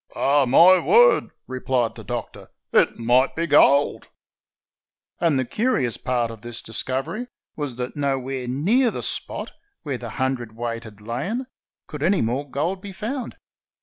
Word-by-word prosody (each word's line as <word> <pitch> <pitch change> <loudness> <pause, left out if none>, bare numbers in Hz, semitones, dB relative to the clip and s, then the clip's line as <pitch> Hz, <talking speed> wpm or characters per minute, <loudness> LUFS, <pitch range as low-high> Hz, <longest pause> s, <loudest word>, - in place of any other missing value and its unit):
"Ah! 140 -1 +3
my 180 +8 +7
word," 485 - +5 0.2
replied 130 -2 -1
the - - -10
Doctor, - - -6 0.3
"it - - +3
might 120 +3 +2
be 165 - -1
gold." 145 -2 +4 1.1
And 165 -5 +2
the 130 - 0
curious 140 - 0
part 120 -2 -1
of 110 -2 -11
this 120 -1 -8
discovery 130 - -3 0.3
was 145 -5 -4
that 125 +1 -5
nowhere 135 -3 -2
near 200 - +2
the - - -5
spot - - -4 0.3
where 135 -5 -3
the 120 - -6
hundredweight 120 -3 -3
had 105 -2 -13
lain 140 - -3 0.4
could 150 -2 -8
any 185 +5 +2
more 130 +5 -2
gold 165 +9 -2
be 200 - -8
found. 235 +5 -5
135 Hz, 150 wpm, -23 LUFS, 120-170 Hz, 1.1 s, my